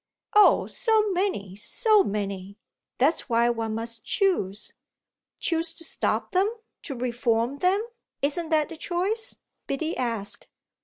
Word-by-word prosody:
"Oh 420 -1 +6
so 435 -3 +2
many, 350 - -1
so 415 - +3
many! 200 -1 -4 0.4
That's 285 +2 +2
why 235 +1 +3
one 225 -2 -2
must 230 -1 -5
choose." 215 - 0 0.7
"Choose 330 -1 0
to 330 - -3
stop - - -1
them, 380 +3 +3 0.3
to 275 - -6
reform 240 +1 0
them 380 +5 +2 0.4
isn't 315 +3 0
that 310 -2 +2
the 330 - -8
choice?" 380 +7 -2 0.3
Biddy 315 +4 -2
asked. 225 -5 -3
280 Hz, 125 wpm, -26 LUFS, 225-365 Hz, 0.7 s, Oh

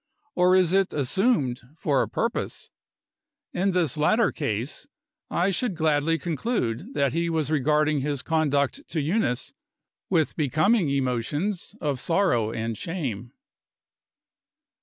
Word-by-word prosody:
Or 180 +1 +4
is 185 -2 +3
it 195 -1 +2
assumed 145 - +1 0.2
for 140 -5 +1
a - - -2
purpose? 230 - -3 0.8
In 190 +3 +1
this 175 -6 0
latter 215 +8 +3
case, 125 - -3 0.4
I 180 +3 +1
should 200 +1 -1
gladly 160 0 +2
conclude 170 - -2
that 140 -2 +1
he 170 0 0
was 160 -3 -1
regarding 150 0 +2
his 140 -1 -2
conduct 155 - +1
to 165 - -2
Eunice 145 - 0 0.6
with 165 -5 +1
becoming 155 - +2
emotions 140 - -1
of 145 -4 -1
sorrow 150 - +1
and 115 0 -3
shame. 125 - -4
155 Hz, 120 wpm, -25 LUFS, 135-180 Hz, 0.8 s, Or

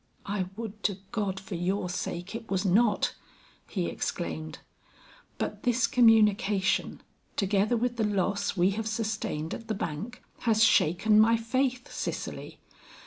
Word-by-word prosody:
"I 195 -2 -2
would 215 -1 -7
to 200 -3 +1
God 195 -3 -2
for 190 - -9
your 180 +2 -1
sake, 180 +1 -4
it 225 0 -7
was 195 0 0
not!" 205 +3 +3 0.5
he - - -2
exclaimed. 80 -1 -4 0.8
"But 210 -1 -3
this 245 +1 +2
communication 210 -4 +3 0.3
together 205 +3 +2
with 240 +1 -1
the 225 - +1
loss 200 -1 0
we 180 +2 +4
have 220 +2 -3
sustained 215 -8 -2
at 230 - -7
the 220 - -1
bank, 195 +8 -5 0.2
has 220 -2 +3
shaken 210 +1 +4
my 230 +1 +5
faith, 250 +2 -1
Cicely. - - -5
210 Hz, 140 wpm, -28 LUFS, 190-225 Hz, 0.8 s, my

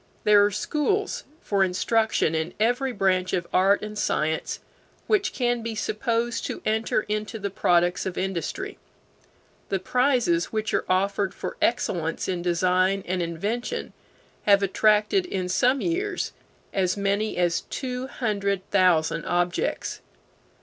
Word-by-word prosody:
There 210 -1 +6
are 205 - +4
schools 400 - -1 0.2
for 200 -2 +1
instruction 195 -1 +1
in 160 +2 -2
every 245 +4 +1
branch 185 -4 +1
of 175 -2 0
art 195 +3 +4
and 210 0 -6
science 160 -5 -1 0.5
which 405 -3 +2
can 245 -2 0
be 225 0 -4
supposed 230 +2 -1
to - - -5
enter 220 0 +1
into 215 +2 -3
the 200 -2 -4
products 175 0 +2
of 185 - -5
industry. 190 - -3 0.9
The 195 - +1
prizes 245 -5 +2
which 215 -1 -3
are - - +1
offered 195 +1 +1
for - - -5
excellence 170 -8 0
in 180 -2 -2
design 185 +2 +2
and 180 0 -1
invention 200 +9 -3 0.5
have 200 -1 +6
attracted, 215 - +3
in 185 - -2
some 250 +8 +2
years, 380 +4 -1 0.4
as 185 0 +1
many 200 +2 0
as 175 -2 +1
two 255 -1 -4
hundred 200 -7 -2
thousand 170 -4 +3
objects. 175 0 -1
200 Hz, 135 wpm, -25 LUFS, 180-235 Hz, 0.9 s, There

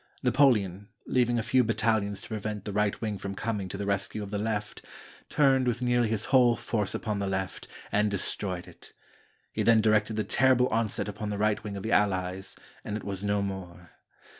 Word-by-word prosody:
Napoleon, 105 -9 +3 0.2
leaving 120 -1 +2
a 115 - 0
few 130 +2 +3
battalions 110 -3 0
to - - -11
prevent 105 -1 -4
the 105 - -4
right 105 0 +1
wing 105 -3 -2
from 100 0 -5
coming 105 -4 -3
to 100 - -5
the 100 - -3
rescue 100 +1 -1
of 100 - -8
the 105 - -1
left, 105 -1 -3 0.5
turned 135 -3 +3
with 120 +1 0
nearly 120 -1 +2
his 110 -1 0
whole 125 -3 +6
force 105 -3 -2
upon 105 -3 -2
the 100 - -1
left, 95 -1 -3 0.2
and 105 0 +2
destroyed 95 -2 -3
it. - - -15 0.6
He - - -1
then 115 -1 +5
directed 110 0 +2
the 110 - 0
terrible 130 0 +3
onset 110 -2 0
upon 105 +1 -5
the 105 - -2
right 105 +1 +1
wing 100 -2 -5
of 95 - -6
the 110 - -2
Allies, 95 -2 0 0.3
and 105 - -3
it 110 - -8
was 100 -1 -5
no 100 0 +1
more. 90 -3 -7
105 Hz, 200 wpm, -28 LUFS, 100-115 Hz, 0.6 s, whole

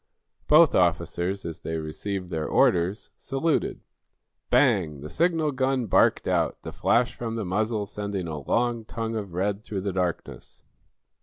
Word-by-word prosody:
Both 155 0 +6
officers, 85 +2 0
as 85 0 -6
they 80 -1 -3
received 90 +4 -5
their 80 -2 -2
orders, 90 +4 +2
saluted. 140 +4 -1 0.7
Bang! 95 - +2
The 75 - -8
signal 165 -2 +1
gun 130 -1 0
barked 100 - +3
out, - - 0
the - - -7
flash 120 +1 +2
from 115 -2 -5
the 110 -3 -3
muzzle 105 +3 -1
sending 100 -3 -4
a 75 -2 -4
long 120 - 0
tongue 115 0 -4
of 100 -5 -5
red 100 +2 -1
through 100 -3 -5
the 100 0 -3
darkness. 90 -2 -4
100 Hz, 150 wpm, -26 LUFS, 85-120 Hz, 0.7 s, Both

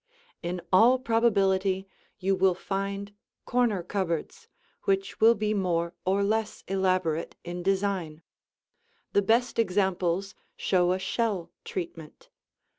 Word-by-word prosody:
In 175 +1 -3
all 235 +7 +7
probability 195 -5 +2 0.3
you 195 0 +1
will 185 -1 +3
find 195 +2 -4 0.3
corner 235 -7 +1
cupboards 175 -4 -3 0.4
which 390 -1 0
will 230 +1 +7
be 215 0 0
more 170 -4 0
or 195 +2 +2
less 215 +1 -1
elaborate 185 -4 0
in 175 0 -5
design. 190 -4 -1 0.9
The 200 - +4
best 230 +4 +1
examples 190 -2 +1 0.2
show 180 -2 +2
a - - 0
shell 190 -3 -2
treatment. 165 -4 -7
195 Hz, 115 wpm, -27 LUFS, 180-210 Hz, 0.9 s, all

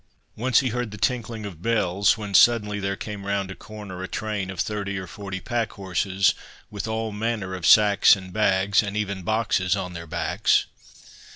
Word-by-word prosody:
Once 125 +3 +3
he 130 - -1
heard 120 0 -2
the 105 - -9
tinkling 115 -1 -2
of 90 -5 -9
bells, 100 -2 +2
when 105 -2 -6
suddenly 105 -2 +4
there 100 0 -2
came 105 0 -7
round 100 -1 -2
a - - -7
corner 105 -4 -9
a 95 - -4
train 105 -3 -3
of 95 -2 -7
thirty 100 -2 -2
or 95 - -5
forty 95 +1 -7
pack 115 +2 -2
horses, 95 0 +1 0.4
with 105 +1 -5
all 110 0 -2
manner 105 -3 -3
of 90 -2 -2
sacks 105 -1 +7
and 95 -2 -10
bags, 100 0 +3
and 100 -1 -4
even 100 -2 -2
boxes 95 -2 +1
on 90 -2 -4
their 85 -1 -8
backs. 85 +1 +1
100 Hz, 185 wpm, -24 LUFS, 95-110 Hz, 0.4 s, sacks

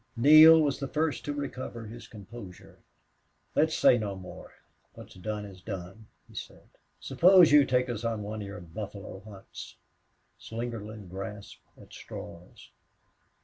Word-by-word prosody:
Neale 155 +5 +9
was 145 -3 0
the 140 - -3
first 155 +2 -1
to 145 - -2
recover 130 -5 -6
his 115 +3 -10
composure. 100 -3 -12 0.7
"Let's 160 +1 +2
say 120 - +5
no 100 -3 -4
more. 95 -1 -11 0.4
What's - - -12
done 105 +3 -5
is 95 -2 -12
done," 95 +4 -8 0.2
he - - -18
said. - - -10 0.3
"Suppose 175 +5 +5
you 145 -1 +7
take 125 0 +1
us 120 -2 -5
on 115 -2 -2
one 105 +1 -5
of 100 - -6
your 100 -1 -8
buffalo 95 +2 -8
hunts." 100 -1 -11 0.6
Slingerland 110 -4 -7
grasped 100 +2 -8 0.2
at - - -16
straws. 85 -8 -11
110 Hz, 145 wpm, -28 LUFS, 100-135 Hz, 0.7 s, Neale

